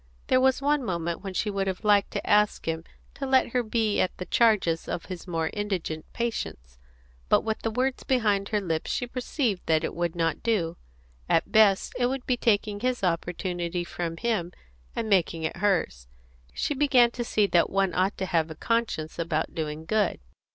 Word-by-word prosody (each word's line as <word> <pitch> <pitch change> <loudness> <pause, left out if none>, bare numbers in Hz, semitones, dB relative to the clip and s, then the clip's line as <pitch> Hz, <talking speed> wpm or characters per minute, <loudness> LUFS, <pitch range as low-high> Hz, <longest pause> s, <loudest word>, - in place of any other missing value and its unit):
There 255 0 +4
was 265 +1 +3
one 290 -1 +2
moment 170 -5 -2
when 190 -2 -6
she 210 - 0
would 195 -1 -1
have 190 +2 -3
liked 205 -2 +4
to - - -3
ask 210 -3 +3
him 160 0 -2 0.3
to 275 - -5
let 265 -2 +3
her 250 +1 +1
be 220 -2 0
at 185 - -1
the 180 - -5
charges 200 -9 +2
of 170 - -4
his 185 -1 -8
more 165 -2 -1
indigent 190 -7 -3
patients, 65 - -4 0.5
but - - +5
with 220 -1 -3
the 225 - -1
words 255 +3 -1
behind 210 -6 +1
her 210 - +1
lips 165 -5 -2
she 245 - -1
perceived 245 - -2
that 160 0 +3
it - - -2
would 170 -1 -2
not 165 -2 0
do. 180 -8 0 0.5
At 165 - +4
the - - -24
best, 210 -3 +4
it 245 - +3
would 265 0 -3
be 250 - +2
taking 210 -3 +1
his 250 -1 -1
opportunity 175 0 -1
from 170 -1 -4
him 215 -6 -1 0.4
and 225 - -2
making 170 -5 +2
it 160 - -2
hers. 175 - 0 0.4
She 295 - -1
began 260 -4 +4
to 240 - -4
see 215 -3 +2
that 175 -4 +3
one 195 -2 +1
ought 185 +3 +1
to 190 - -2
have 165 -3 +1
a 160 - -7
conscience 215 -7 -1
about 160 -1 -1
doing 155 -1 -4
good. 210 +2 +1
195 Hz, 195 wpm, -27 LUFS, 170-230 Hz, 0.5 s, but